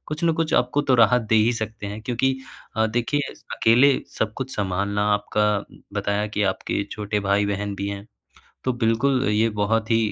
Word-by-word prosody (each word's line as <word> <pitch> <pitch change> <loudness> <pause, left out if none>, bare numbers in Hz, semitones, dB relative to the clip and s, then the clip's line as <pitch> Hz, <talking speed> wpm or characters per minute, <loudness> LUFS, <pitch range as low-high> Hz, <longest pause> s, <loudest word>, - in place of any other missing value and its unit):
कुछ 155 +3 -3
न 165 - +4
कुछ 160 0 -1
आपको 125 +4 +2
तो 135 -3 +2
राहत 120 +1 +5
दे - - +5
ही 110 +3 +4
सकते 110 -2 -5
हैं 105 +2 -6
क्योंकि 130 +3 0 0.4
अ, 110 0 +3
देखिए 120 +6 -1 0.2
अकेले 125 +5 +5 0.2
सब 110 -1 0
कुछ 130 0 -5
संभालना। 100 +1 -1
आपका 105 +1 0 0.5
बताया 105 +1 0
कि 105 0 -2
आपके 100 - -3
छोटे 105 0 -2
भाई-बहन 100 0 0
भी 100 +1 -3
हैं। 100 0 -6 0.6
तो 130 - +1
बिल्कुल 125 +4 +2
ये 110 +2 +2
बहुत 110 +2 0
ही 115 - +5
110 Hz, 180 wpm, -23 LUFS, 105-125 Hz, 0.6 s, राहत